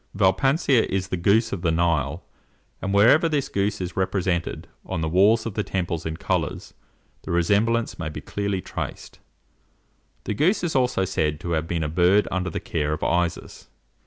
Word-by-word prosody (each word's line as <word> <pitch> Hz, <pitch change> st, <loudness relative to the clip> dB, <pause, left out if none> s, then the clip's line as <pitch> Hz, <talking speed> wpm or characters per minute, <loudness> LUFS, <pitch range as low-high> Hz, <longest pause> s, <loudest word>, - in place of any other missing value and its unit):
Vielpanser 115 Hz, -, +3 dB
is 95 Hz, -1 st, -2 dB
the -, -, -1 dB
goose 105 Hz, +6 st, +2 dB
of 90 Hz, -, -4 dB
the 85 Hz, -, +1 dB
Nile, 80 Hz, -2 st, 0 dB, 0.6 s
and 95 Hz, -, -2 dB
wherever 120 Hz, -, +5 dB
this 145 Hz, -3 st, -1 dB
goose 100 Hz, +1 st, -1 dB
is 90 Hz, -2 st, -5 dB
represented 95 Hz, -2 st, -1 dB, 0.2 s
on 80 Hz, -, -4 dB
the 80 Hz, -, -1 dB
walls 100 Hz, +7 st, +4 dB
of 115 Hz, -, -4 dB
the 105 Hz, -, -1 dB
temples 85 Hz, -5 st, -3 dB
in 80 Hz, 0 st, -4 dB
colours, -, -, -2 dB, 0.5 s
the -, -, -11 dB
resemblance 105 Hz, +7 st, +1 dB
may 80 Hz, -2 st, -3 dB
be 75 Hz, -, -7 dB
clearly 100 Hz, -2 st, -3 dB
traced." -, -, -7 dB, 1.0 s
The -, -, -2 dB
goose 175 Hz, -, +1 dB
is 170 Hz, -3 st, -2 dB
also 125 Hz, -7 st, +2 dB
said 75 Hz, -5 st, -1 dB
to 85 Hz, -, -4 dB
have 80 Hz, 0 st, -1 dB
been 85 Hz, -1 st, -1 dB
a -, -, -1 dB
bird 90 Hz, +6 st, +3 dB
under 95 Hz, 0 st, -1 dB
the -, -, -4 dB
care 75 Hz, -1 st, -2 dB
of 75 Hz, -, -5 dB
Isis. 90 Hz, 0 st, -2 dB
95 Hz, 180 wpm, -24 LUFS, 85-105 Hz, 1.0 s, wherever